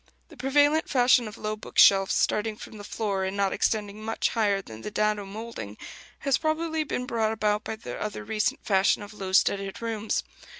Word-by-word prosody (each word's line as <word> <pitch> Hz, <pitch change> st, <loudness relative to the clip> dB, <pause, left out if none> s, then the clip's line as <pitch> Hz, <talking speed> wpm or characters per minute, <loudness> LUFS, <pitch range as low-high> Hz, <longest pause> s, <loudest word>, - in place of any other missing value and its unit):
The 325 Hz, -, -14 dB
prevalent 290 Hz, +4 st, +2 dB
fashion 245 Hz, -3 st, +4 dB
of 210 Hz, -, -9 dB
low 215 Hz, 0 st, -3 dB
book 215 Hz, -, -12 dB
shelves, 195 Hz, -1 st, +6 dB
starting 215 Hz, +1 st, +1 dB
from 215 Hz, -1 st, -10 dB
the -, -, -8 dB
floor, 200 Hz, -2 st, -2 dB
and 190 Hz, +1 st, -3 dB
not 200 Hz, -1 st, +1 dB
extending 210 Hz, -1 st, -1 dB
much 225 Hz, +1 st, 0 dB
higher 205 Hz, -4 st, +1 dB
than 110 Hz, -, -10 dB
the -, -, -5 dB
dado 210 Hz, -1 st, 0 dB
moulding, 205 Hz, -, -7 dB, 0.4 s
has 275 Hz, -2 st, +2 dB
probably 315 Hz, 0 st, 0 dB
been 250 Hz, -4 st, -3 dB
brought 220 Hz, -3 st, 0 dB
about 210 Hz, -1 st, 0 dB
by 220 Hz, -, -4 dB
the 220 Hz, -, -8 dB
other 210 Hz, -1 st, -4 dB
recent 215 Hz, -1 st, -1 dB
fashion 195 Hz, +1 st, +3 dB
of 205 Hz, -, -10 dB
low 190 Hz, -2 st, -6 dB
studded 195 Hz, 0 st, +2 dB
rooms. 225 Hz, -2 st, -2 dB
215 Hz, 195 wpm, -27 LUFS, 200-235 Hz, 0.4 s, shelves